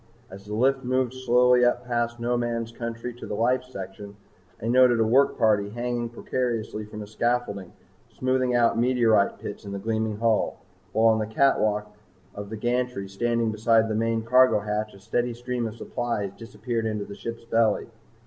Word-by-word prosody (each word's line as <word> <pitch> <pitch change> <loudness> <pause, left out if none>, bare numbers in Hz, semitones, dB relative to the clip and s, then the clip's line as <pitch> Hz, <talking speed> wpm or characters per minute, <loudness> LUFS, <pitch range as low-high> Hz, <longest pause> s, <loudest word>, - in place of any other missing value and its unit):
As 100 +2 -11
the 105 - -4
lift 135 +3 +2
moved 130 0 0
slowly 125 -1 +4
up 120 0 +2
past 120 -1 -1
no 120 +1 0
man's 115 -1 -2
country 115 +1 -5
to 120 - -10
the - - -3
life 125 +3 +1
section, 100 -4 -9 0.4
I 110 - -4
noted 125 -1 +5
a - - +4
work 130 +6 +3
party 105 -3 +2
hanging 120 +1 -3
precariously 115 -3 -3
from 105 0 -8
a - - -10
scaffolding 110 -4 -2 0.4
smoothing 130 -1 0
out 115 -1 +3
meteorite 115 -5 +3
pits 100 - -7
in 100 -1 -7
the - - -3
gleaming 110 +1 -2
hull, 115 -1 +1 0.3
while 110 0 +4
on 110 - 0
the 110 - -2
catwalk 105 -4 +1 0.4
of 100 0 -7
the 110 - -5
gantry 120 -3 -1
standing 115 +3 0
beside 110 +1 +3
the 110 - -2
main 115 +1 0
cargo 125 -2 +4
hatch 105 0 -3
a - - -14
steady 120 +4 -1
stream 120 -1 -3
of 110 - -7
supplies 115 -4 -3
disappeared 115 0 -4
into 105 -2 -3
the 100 - -9
ship's 115 +2 -7
belly. 115 -2 +2
115 Hz, 180 wpm, -25 LUFS, 105-120 Hz, 0.4 s, noted